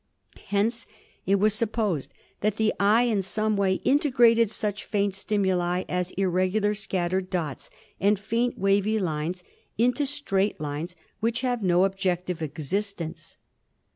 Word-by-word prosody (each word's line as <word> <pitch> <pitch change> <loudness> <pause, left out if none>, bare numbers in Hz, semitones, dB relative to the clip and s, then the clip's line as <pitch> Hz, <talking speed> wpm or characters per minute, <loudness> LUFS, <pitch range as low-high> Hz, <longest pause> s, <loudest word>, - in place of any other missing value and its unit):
Hence 220 +4 0 0.4
it 195 - +4
was 205 +1 +3
supposed 215 - -1 0.3
that 210 +1 0
the 220 -1 +1
eye 210 +4 +4
in 225 -5 +1
some 215 +3 0
way 195 -1 +2
integrated 240 -5 +4
such 210 -1 -2
faint 200 -2 0
stimuli 185 -3 0
as 180 0 -1
irregular 190 +3 +1
scattered 185 -2 -1
dots 160 -7 -3 0.3
and 200 +1 +3
faint, 230 +4 -1
wavy 200 +2 +2
lines 175 -1 -2 0.3
into 250 +5 +2
straight 210 -9 -1
lines 150 +4 -4 0.2
which 230 +2 0
have 245 -3 -1
no 180 -1 +3
objective 180 -3 -1
existence. 165 +2 -4
200 Hz, 130 wpm, -26 LUFS, 180-215 Hz, 0.4 s, it